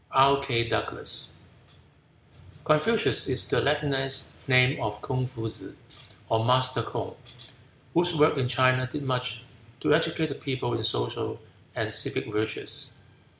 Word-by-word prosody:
K. 135 Hz, -3 st, +3 dB
DOUGLAS 110 Hz, -2 st, -1 dB, 1.3 s
Confucius 210 Hz, +9 st, +3 dB
is 130 Hz, -1 st, +2 dB
the -, -, +1 dB
Latinized 140 Hz, -2 st, 0 dB, 0.2 s
name 125 Hz, +1 st, +4 dB
of 105 Hz, -2 st, -3 dB
Kung 130 Hz, -1 st, -3 dB
Futusze, 115 Hz, -4 st, -8 dB, 0.5 s
or 110 Hz, 0 st, +1 dB
"Master 130 Hz, +2 st, +2 dB
Kung," -, -, -5 dB, 0.8 s
whose 175 Hz, 0 st, +3 dB
work 150 Hz, +1 st, +4 dB
in 130 Hz, -3 st, 0 dB
China 130 Hz, 0 st, +2 dB
did 145 Hz, +1 st, -5 dB
much 125 Hz, -3 st, -2 dB, 0.4 s
to 150 Hz, -, +2 dB
educate 160 Hz, 0 st, +1 dB
the -, -, -3 dB
people 130 Hz, -3 st, -4 dB
in 115 Hz, -1 st, -2 dB
social -, -, -2 dB, 0.4 s
and -, -, -2 dB
civic -, -, +1 dB
virtues. 110 Hz, 0 st, 0 dB
130 Hz, 125 wpm, -26 LUFS, 120-140 Hz, 1.3 s, name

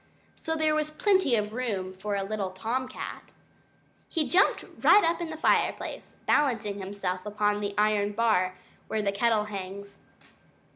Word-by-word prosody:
So 320 Hz, -, -3 dB
there 315 Hz, -1 st, +2 dB
was 305 Hz, 0 st, 0 dB
plenty 370 Hz, -, +2 dB
of 210 Hz, -1 st, -1 dB
room 205 Hz, -7 st, -3 dB
for 200 Hz, +2 st, -3 dB
a 195 Hz, -, -1 dB
little 200 Hz, -1 st, -2 dB
Tom 230 Hz, +8 st, -2 dB
Cat. -, -, -8 dB, 0.8 s
He 315 Hz, -3 st, 0 dB
jumped 380 Hz, +3 st, +3 dB, 0.2 s
right 415 Hz, -, +7 dB
up 335 Hz, +1 st, +1 dB
into 320 Hz, -2 st, -4 dB
the -, -, -12 dB
fireplace, -, -, 0 dB
balancing 225 Hz, -8 st, +1 dB
himself 190 Hz, -2 st, -4 dB
upon 210 Hz, 0 st, 0 dB
the 205 Hz, -1 st, -3 dB
iron 210 Hz, -1 st, +2 dB
bar 195 Hz, -5 st, +1 dB, 0.3 s
where 220 Hz, -1 st, -1 dB
the 200 Hz, -, +1 dB
kettle 215 Hz, +1 st, +2 dB
hangs. 200 Hz, -1 st, -7 dB
210 Hz, 155 wpm, -28 LUFS, 200-265 Hz, 0.8 s, right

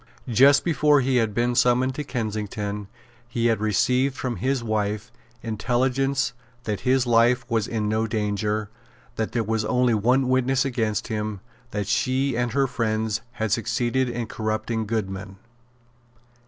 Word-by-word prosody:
Just 135 Hz, +4 st, +5 dB
before 150 Hz, -4 st, +4 dB
he 130 Hz, 0 st, +1 dB
had 115 Hz, -3 st, +2 dB
been 120 Hz, +1 st, +1 dB
summoned 125 Hz, +2 st, +3 dB
to 150 Hz, -, -4 dB
Kensington, 105 Hz, -4 st, -4 dB, 0.4 s
he 120 Hz, 0 st, -2 dB
had 115 Hz, -3 st, +3 dB
received 125 Hz, +6 st, +1 dB
from 125 Hz, -3 st, -3 dB
his 130 Hz, -1 st, -1 dB
wife 110 Hz, 0 st, -2 dB, 0.3 s
intelligence 130 Hz, +4 st, 0 dB, 0.3 s
that 105 Hz, -4 st, -2 dB
his 130 Hz, 0 st, +2 dB
life 120 Hz, +1 st, +3 dB
was 115 Hz, -3 st, 0 dB
in 110 Hz, -2 st, -2 dB
no 110 Hz, +1 st, 0 dB
danger, 105 Hz, -1 st, -1 dB, 0.5 s
that 110 Hz, -, -3 dB
there 115 Hz, -, +1 dB
was 110 Hz, 0 st, -1 dB
only 125 Hz, +2 st, +2 dB
one 125 Hz, +5 st, +2 dB
witness 130 Hz, +1 st, +2 dB
against 115 Hz, -5 st, -1 dB
him, 105 Hz, -2 st, -3 dB, 0.3 s
that 105 Hz, -4 st, -3 dB
she 130 Hz, +5 st, +1 dB
and 120 Hz, -1 st, -1 dB
her 140 Hz, 0 st, +3 dB
friends 110 Hz, -3 st, -1 dB
had 110 Hz, -2 st, -2 dB
succeeded 120 Hz, +3 st, 0 dB
in 120 Hz, -1 st, -3 dB
corrupting 110 Hz, 0 st, -2 dB
Goodman. 95 Hz, -3 st, -4 dB
115 Hz, 145 wpm, -24 LUFS, 110-125 Hz, 0.5 s, Just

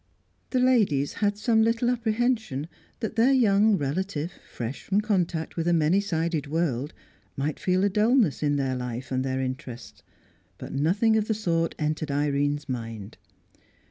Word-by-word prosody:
The 255 Hz, -, -1 dB
ladies 210 Hz, -, +2 dB
had 205 Hz, 0 st, +1 dB
some 220 Hz, +1 st, +2 dB
little 230 Hz, +2 st, +2 dB
apprehension 225 Hz, -, -1 dB, 0.3 s
that 220 Hz, 0 st, -4 dB
their 240 Hz, +4 st, +5 dB
young 215 Hz, -5 st, +4 dB
relative, 160 Hz, +2 st, -2 dB, 0.2 s
fresh 120 Hz, +3 st, -5 dB
from 200 Hz, +1 st, 0 dB
contact 180 Hz, -6 st, -1 dB
with 165 Hz, 0 st, -2 dB
a 175 Hz, -, +3 dB
many 165 Hz, +3 st, +3 dB
sided 165 Hz, -6 st, -1 dB
world, 150 Hz, -3 st, -1 dB, 0.5 s
might 145 Hz, +2 st, -2 dB
feel 185 Hz, +1 st, +1 dB
a 200 Hz, -, +3 dB
dulness 215 Hz, -, +2 dB
in 145 Hz, -1 st, +1 dB
their 135 Hz, -2 st, 0 dB
life 125 Hz, +1 st, -5 dB
and 130 Hz, 0 st, 0 dB
their 130 Hz, 0 st, -2 dB
interests; 130 Hz, -, -6 dB, 0.6 s
but -, -, -8 dB
nothing 200 Hz, +10 st, +2 dB
of 215 Hz, -1 st, 0 dB
the 220 Hz, -, 0 dB
sort 165 Hz, -6 st, 0 dB
entered 155 Hz, 0 st, -2 dB
Irene's 145 Hz, +1 st, 0 dB
mind. 115 Hz, -4 st, -6 dB
165 Hz, 155 wpm, -26 LUFS, 140-215 Hz, 0.6 s, their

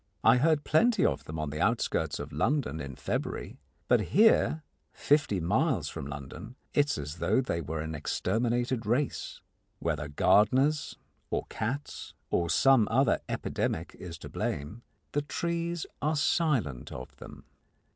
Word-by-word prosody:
I 115 Hz, +2 st, +6 dB
heard 150 Hz, +2 st, +3 dB
plenty 215 Hz, +7 st, +3 dB
of 75 Hz, -, 0 dB
them 80 Hz, +2 st, -6 dB
on 75 Hz, -2 st, -3 dB
the 75 Hz, -, -4 dB
outskirts -, -, +1 dB
of -, -, -7 dB
London 130 Hz, -, 0 dB
in 70 Hz, -3 st, -6 dB
February, -, -, -4 dB, 0.3 s
but -, -, +5 dB
here, 200 Hz, -6 st, +4 dB, 0.3 s
fifty 145 Hz, -10 st, +2 dB
miles 100 Hz, -, +1 dB
from 70 Hz, -, -6 dB
London, 70 Hz, -, -8 dB, 0.2 s
it 145 Hz, -1 st, +4 dB
is -, -, -1 dB
as 75 Hz, +1 st, -5 dB
though 110 Hz, -, +2 dB
they 85 Hz, -10 st, -1 dB
were 80 Hz, 0 st, -4 dB
an 80 Hz, 0 st, -4 dB
exterminated 115 Hz, -, -1 dB
race. 130 Hz, +5 st, -1 dB, 0.4 s
Whether 75 Hz, -2 st, -2 dB
gardeners 130 Hz, -, +3 dB, 0.3 s
or -, -, -1 dB
cats 125 Hz, +7 st, -4 dB, 0.2 s
or 85 Hz, -1 st, +1 dB
some 130 Hz, -, +5 dB
other 130 Hz, +2 st, +3 dB
epidemic 80 Hz, +2 st, -2 dB
is 85 Hz, -3 st, -7 dB
to -, -, -9 dB
blame, 75 Hz, +11 st, -4 dB, 0.3 s
the 145 Hz, -, 0 dB
trees 170 Hz, +2 st, -2 dB, 0.2 s
are 155 Hz, +3 st, +1 dB
silent 135 Hz, -, 0 dB
of 65 Hz, 0 st, -8 dB
them. -, -, -12 dB
115 Hz, 145 wpm, -29 LUFS, -, 0.4 s, I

